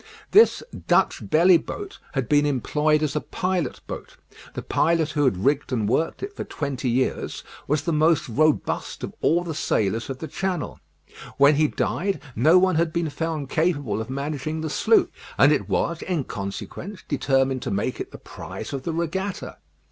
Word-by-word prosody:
This 435 +3 +6 0.2
"Dutch - - +2
Belly 170 +3 +6
Boat" 405 - -7
had 135 -4 -1
been 145 0 +4
employed 150 +3 +1
as 150 -1 -1
a 150 - 0
pilot 180 -3 -2
boat. - - -8 0.4
The - - -4
pilot 165 -1 +1
who 145 -1 +1
had 95 -6 0
rigged 140 -1 +1
and 110 -5 0
worked 160 - 0
it 405 +1 -5
for - - -4
twenty 135 -3 -3
years 130 +2 -1 0.2
was 145 0 +1
the 170 - -1
most 155 +1 +3
robust 155 +6 0
of - - -5
all 170 +2 +3
the 170 -2 -4
sailors 115 -6 0
of 135 - -4
the 160 - -6
channel. 180 +1 -3 0.6
When 140 +2 +6
he 155 +1 +3
died 195 +6 -1 0.2
no 155 +10 +5
one 185 -2 +3
had 165 -1 +1
been 165 -2 -1
found 155 -3 -3
capable 145 - 0
of 110 - -7
managing 145 +3 -3
the 155 -1 -3
sloop; 225 +7 +3 0.3
and 145 - +6
it 105 -10 0
was, 170 - 0
in 175 -6 -1
consequence, 115 - -6
determined 135 -2 +1
to - - -3
make 100 +6 -2
it - - -5
the - - -9
prize - - -8
of 135 - -3
the 165 +5 -3
regatta. 185 +4 -3
150 Hz, 180 wpm, -24 LUFS, 135-170 Hz, 0.6 s, This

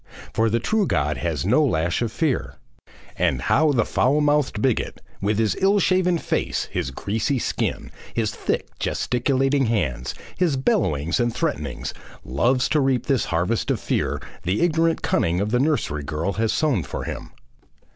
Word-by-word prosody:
For 115 0 +2
the 115 +2 +1
true 215 - +1
God 75 -1 0
has 80 -6 -2
no 125 +10 +4
lash 85 - +1
of 115 -2 -1
fear. 115 - -1 0.6
And 65 - +1
how 155 - +3
the 120 -5 +2
foul 140 +4 +2
minded 145 -6 +2
bigot, 125 0 0 0.2
with 100 +1 +1
his 110 -2 +1
ill 195 +2 +4
shaven 185 -2 +3
face, - - -1
his - - -2
greasy 110 - -1
skin, - - -2 0.2
his 110 -3 -1
thick, - - -2
gesticulating 135 +2 +1
hands, 75 - -1 0.2
his 170 -6 +1
bellowings 85 - +1
and 120 -1 +2
threatenings, - - -3 0.3
loves 120 - +2
to 155 - +3
reap 130 -3 +1
this 135 -2 +1
harvest 105 +8 0
of 130 -5 +1
fear - - -1 0.2
the 95 +4 -1
ignorant 165 -1 +2
cunning 85 +2 +1
of 105 +2 -1
the 125 - +2
nursery 130 - 0
girl 80 +6 -2
has 110 +1 0
sown 145 - +1
for - - -5
him! - - -6
120 Hz, 165 wpm, -23 LUFS, 90-145 Hz, 0.6 s, no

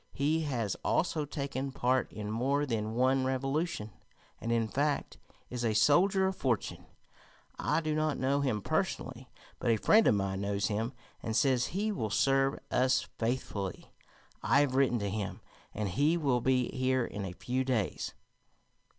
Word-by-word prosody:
He 155 +4 +1
has 115 -8 -1
also 160 -3 +1
taken 140 -2 -4
part 130 -1 +1
in 105 -1 -5
more 135 +6 +1
than 110 -4 -2
one 130 +2 +3
revolution, 135 -2 -1 0.5
and, 115 - -3
in 115 -1 +2
fact, 145 +5 -1 0.3
is 125 -1 -3
a 110 -2 +1
soldier 180 - +4
of 190 0 0
fortune. 125 - -2 0.7
I 165 - +1
do 155 -1 -1
not 155 -1 0
know 140 +2 +1
him 115 -7 -1
personally, 135 -7 -2 0.3
but 120 - -1
a 115 - +4
friend 215 - +5
of - - +5
mine 95 -1 -1
knows 100 +1 0
him, 110 +4 -2 0.3
and 110 - -3
says 130 -2 +3
he 205 +5 -1
will 110 - -2
serve 135 +5 +2
us 130 0 +2
faithfully. 115 -5 -3 0.5
I 140 - +4
have 140 -3 +1
written 130 -2 +3
to 100 -2 -2
him, 105 -1 -3 0.3
and 105 -1 -3
he 145 - +2
will 135 -7 +1
be 130 0 +2
here 130 -1 +1
in 105 -2 -5
a 95 -2 -5
few 125 +7 -2
days." 125 -7 -1
130 Hz, 165 wpm, -31 LUFS, 110-140 Hz, 0.7 s, friend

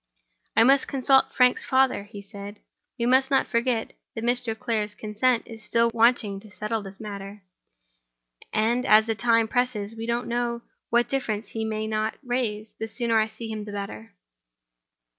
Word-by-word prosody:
"I 225 - +8
must 270 +2 +5
consult 270 0 +3
Frank's 250 -1 +3
father," 260 -6 +2
he 205 -1 -10
replied. 205 0 -9 0.4
"We 235 - -1
must 260 +2 +4
not 270 - +3
forget 235 -1 -1 0.2
that 225 - -4
Mr. 240 -2 0
Clare's 215 -2 -2
consent 225 +3 0
is 225 -2 -10
still 230 +2 +2
wanting 225 -4 +3
to 215 +1 -14
settle 215 +2 -3
this 195 -1 -10
matter. 200 -1 -8 1.1
And 230 +3 +1
as 215 +1 +6
time 230 -1 +3
presses, 230 -4 -1
and 225 - -12
we 225 - -4
don't 235 +1 -1
know 235 0 -2 0.3
what 240 +1 +3
difficulties 225 -5 -2
he 220 -1 -3
may 215 0 -2
not 215 0 -1
raise, 230 -4 -2
the 220 - -3
sooner 230 0 +1
I 215 - +2
see 220 +1 -8
him 215 -1 -4
the 205 - -8
better." 200 +1 -7
225 Hz, 170 wpm, -25 LUFS, 215-240 Hz, 1.1 s, I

